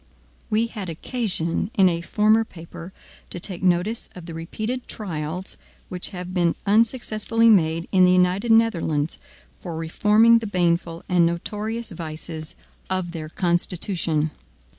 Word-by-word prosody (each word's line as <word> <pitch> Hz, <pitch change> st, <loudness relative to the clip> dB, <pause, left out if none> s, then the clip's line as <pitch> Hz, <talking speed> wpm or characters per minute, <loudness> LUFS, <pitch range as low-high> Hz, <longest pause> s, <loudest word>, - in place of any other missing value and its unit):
We 220 Hz, +2 st, +2 dB
had 210 Hz, -6 st, -6 dB
occasion, 180 Hz, -1 st, -1 dB
in 190 Hz, -2 st, +6 dB
a 170 Hz, -1 st, 0 dB
former 215 Hz, +5 st, +3 dB
paper, 170 Hz, -2 st, -11 dB, 0.4 s
to -, -, -4 dB
take 180 Hz, 0 st, -4 dB
notice 185 Hz, +5 st, +1 dB
of 180 Hz, -2 st, -9 dB
the 165 Hz, -, -7 dB
repeated 215 Hz, +10 st, -4 dB
trials 175 Hz, -2 st, -5 dB, 0.3 s
which 180 Hz, -1 st, -3 dB
have 180 Hz, -2 st, -7 dB
been 175 Hz, -2 st, +2 dB
unsuccessfully 225 Hz, +1 st, +3 dB
made 165 Hz, -4 st, +2 dB
in 185 Hz, -1 st, +5 dB
the 180 Hz, -, +6 dB
United 185 Hz, +5 st, +2 dB
Netherlands 170 Hz, -9 st, +2 dB, 0.4 s
for 170 Hz, -3 st, -6 dB
reforming 210 Hz, +8 st, +4 dB
the 225 Hz, -, -5 dB
baneful 170 Hz, -3 st, 0 dB
and 180 Hz, -2 st, +3 dB
notorious 210 Hz, +7 st, -2 dB
vices 160 Hz, -1 st, -6 dB, 0.3 s
of 185 Hz, -2 st, -1 dB
their 160 Hz, -2 st, -6 dB
constitution. 170 Hz, -2 st, 0 dB
180 Hz, 135 wpm, -23 LUFS, 170-215 Hz, 0.4 s, in